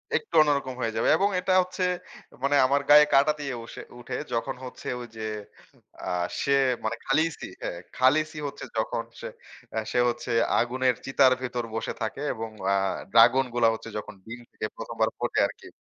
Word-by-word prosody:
একটু 445 - -3
অন্যরকম 140 -3 +1
হয়ে 115 -2 -1
যাবে। 110 - +1
এবং 200 +3 +2
এটা 185 +1 0
হচ্ছে 185 +1 -4 0.6
মানে 140 +1 +3
আমার 140 +2 +2
গায়ে 150 0 +9
কাঁটা 140 +2 +5
দিয়ে 140 -2 -3
উসে - - -9 0.2
উঠে 125 +1 -6 0.2
যখন 120 +3 -1
হচ্ছে, 125 - -9
ঐ - - -7
যে 110 - -7 0.8
আ - - -6 0.3
সে 140 - +2 0.3
মানে 110 +1 -1
'খালিসি', 155 +4 0
হ্যাঁ 85 - -4 0.2
'খালিসি' 150 +4 +2
হচ্ছে 140 0 -8
যখন 110 +1 -1 0.2
সে - - -5 0.5
আ - - -2
সে 125 - +1
হচ্ছে 120 +1 -4 0.3
আগুনের 125 +1 +1
চিতার 135 -1 +5
ভিতর 125 -2 -3
বসে 115 - -2
থাকে, 110 +5 -3
এবং 115 -1 -5 0.2
আ - - +3 0.4
ড্রাগন 120 +4 +6
গুলা 120 -1 +4
হচ্ছে 110 - -7
যখন 105 - -6
ডিম 115 +2 -8
থেকে - - -5
১ম - - -7
বার - - +4
ফোটে - - 0
আরকি - - -12
130 Hz, 180 wpm, -26 LUFS, 115-145 Hz, 0.8 s, গায়ে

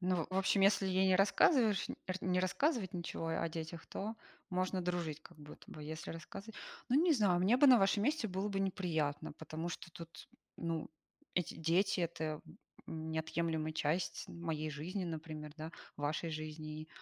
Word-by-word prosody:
Ну 180 -3 +1
в 185 - -5
в - - +3
общем, 195 +1 +3
если 195 0 +5
ей 190 0 +3
не 185 - +6
рассказываешь, 210 - +4
нь - - -3
р 185 - 0
не 180 0 +2
рассказывать 195 - +1
ничего 170 -1 -3
о 165 +1 0
детях, 160 +1 -6
то 215 +3 -4 0.4
можно 185 +1 0
дружить, 170 -4 -2
как - - -15
будто 150 0 -12
бы. 155 - -8
Если 160 +2 -5
рассказыва 195 +6 -8 0.3
ну 275 +6 +5
не 345 -2 +5
знаю, 195 -8 +3
мне 210 +7 +5
бы 285 - +7
на 255 -3 +9
вашем 195 +1 +3
месте 290 -5 +1
было 190 +3 -1
бы 195 -1 -1
неприятно, 165 -6 -1
потому 160 +2 -5
что 170 - -7
тут, 165 -3 -10 0.3
ну 165 -2 -2 0.5
эти 180 - 0
дети 180 +4 +2
это 160 -2 -2 0.5
неотъемлемая 160 0 -1
часть 160 +3 -1
моей 160 -2 -3
жизни, 175 +6 -3
например, 155 -2 -5
да, 160 +1 -6 0.2
вашей 150 +3 -1
жизни 155 0 -5
170 Hz, 175 wpm, -36 LUFS, 160-195 Hz, 0.5 s, на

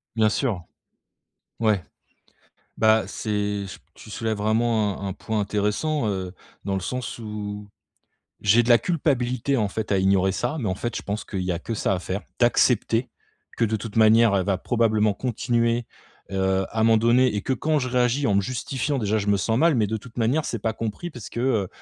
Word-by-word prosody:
Bien 110 -1 +4
sûr. 105 -6 -1 1.0
Ouais. 105 -5 +2 0.9
Bah, 110 0 +4
c'est 105 -2 -2
ch 95 - -9 0.2
tu - - -13
soulèves 110 +1 -2
vraiment 110 -1 +1
un 100 - -4
un - - -2
point 110 +1 -2
intéressant, 105 +8 0
heu, 95 -2 -3 0.3
dans 100 0 -1
le 95 - -1
sens 125 +7 -4
où 105 -2 -6 0.7
j'ai 110 +4 +4
de - - -4
la 120 - +8
culpabilité 135 -5 0
en 110 -5 +1
fait 110 +1 -3
à 100 - +3
ignorer 95 0 +3
ça, 120 +9 -2
mais 115 -8 -2
en 95 - 0
fait, 120 +4 -4
je - - -4
pense 105 +2 -4
qu'il 95 -3 -4
y 90 0 -1
a 85 - -2
que 115 - -4
ça 105 - 0
à - - -2
faire. 95 +3 -4 0.2
D'accepter, 120 0 +3 0.5
que 115 - +2
de 110 0 0
toute 105 +1 -7
manière, 110 0 +5
elle 95 -2 +2
va 95 -1 0
probablement 110 -2 +1
continuer, 120 0 0 0.5
heu, 95 0 +1
à 110 - -1
m'en 115 0 +5
donner 120 +3 +4
et 100 - -2
que 130 - -1
quand 155 +4 +1
je 130 -3 -2
réagis 125 +2 +1
en 105 - +2
me 100 - +4
justifiant 130 +5 -2
déjà, 110 -2 0
je 105 -1 -3
me 100 - +4
sens 110 +3 0
mal, 165 +1 +4
mais 110 -3 +2
de 110 +2 -2
toute 115 +2 -13
manière 125 +7 +1
c'est 115 - -3
pas 110 +2 -1
compris 115 +10 -5
parce 120 -8 -9
que, - - -7
heu, 115 -7 +1
110 Hz, 205 wpm, -24 LUFS, 100-120 Hz, 1.0 s, la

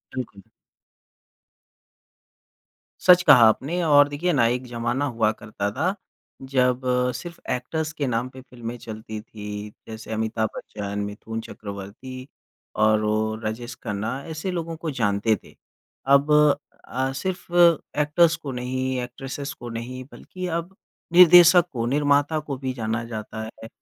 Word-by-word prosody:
बिल्कुल। 110 -6 -6 2.6
सच 180 -1 +8
कहा 120 - +9
आपने 160 +10 -1
और 145 -2 +6
देखिए 165 +4 -1
ना, 120 -5 +3
एक 125 +2 -1
ज़माना 120 +4 -1
हुआ 115 -4 +1
करता 105 -2 -4
था 175 - 0 0.6
जब 125 -1 +2 0.3
सिर्फ़ 170 +3 -8
एक्टर्स 155 +5 -2
के 145 -3 -2
नाम 120 +1 -1
पे 130 0 -12
फ़िल्में 120 -2 -8
चलती 110 -1 -7
थीं। 105 -1 -8 0.2
जैसे 110 0 -8
अमिताभ 110 0 -1
बच्चन, 100 -1 -5
मिथुन 110 +2 -6
चक्रवर्ती 110 +6 -8 0.5
और 110 0 +3
वो 110 +1 0
राजेश 115 +2 -4
खन्ना 105 0 -3 0.2
ऐसे 160 +4 -4
लोगों 165 -2 -4
को 160 -2 -4
जानते 105 +1 +2
थे। - - -17 0.6
अब 140 +2 +4 0.5
अ, 130 +1 -2
सिर्फ़ 180 +3 -4 0.5
एक्टर्स 165 +2 +3
को 150 -4 -7
नहीं, 130 +1 -2
एक्ट्रेसेस 135 +3 -6
को 120 - -9
नहीं, 120 +3 -6
बल्कि 185 0 -7
अब 180 +3 -10 0.4
निर्देशक 175 0 +8
को 115 -1 -2
निर्माता 145 +3 +2
को 145 -3 -5
भी 130 -1 -3
जाना 115 -1 -2
जाता 110 -1 -6
है। 110 0 -9
125 Hz, 135 wpm, -24 LUFS, 110-145 Hz, 2.6 s, कहा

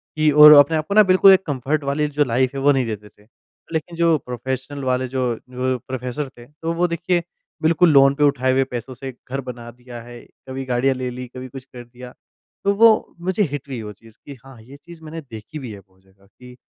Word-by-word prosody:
कि 155 0 +2
और 150 +1 +9
अपने 145 +2 +6
आप 155 0 -4
को - - -2
ना 215 - +8
बिल्कुल 190 0 +6
एक 190 0 +2
कंफर्ट 145 +1 -2
वाली 140 +2 -1
जो 150 0 +1
लाइफ़ 125 +1 0
है - - -3
वो 145 - +5
नहीं 135 -3 +1
देते 105 -2 -6
थे। 105 +1 -27 0.5
लेकिन 160 +2 -3
जो 165 -1 +3
प्रोफ़ेशनल 130 +3 -5
वाले 130 0 0
जो 125 -1 -1
अ, - - -14 0.5
प्रोफ़ेसर 130 +2 -4
थे 120 - -13
तो 155 +4 -5
वो 175 +1 +1
देखिए 175 +1 -1 0.4
बिल्कुल 165 +2 +3
लोन 135 0 +5
पे 150 - 0
उठा 140 -3 +1
हुए 135 +1 +2
पैसों 125 -1 -7
से 130 +2 -8 0.2
घर 135 +2 -3
बना 120 -2 -9
दिया 120 0 -11
है, 120 +1 -12 0.3
कभी 135 +1 -5
गाड़ियाँ 130 +1 +1
ले 130 0 -4
लीं, 125 +1 -7
कभी 130 0 -7
कुछ 130 +1 -10
कर 125 -3 -12
दिया। 125 +1 -13 0.5
तो 200 - +2
वो 225 +1 +4
मुझे 185 +4 0
हिट 145 -1 -6
हुई 130 -4 -6
वो 105 -1 -7
चीज़ 110 +2 -20
कि 140 - -9
हाँ 135 -2 -14
ये 130 +5 -14
चीज़ 170 -1 -14
मैंने 160 +1 -8
देखी 120 +2 -10
भी 130 -5 -8
है 100 - -10
बहुत 95 -1 -26
जगह 95 +1 -27
कि 125 +5 -16
130 Hz, 235 wpm, -21 LUFS, 125-155 Hz, 0.5 s, और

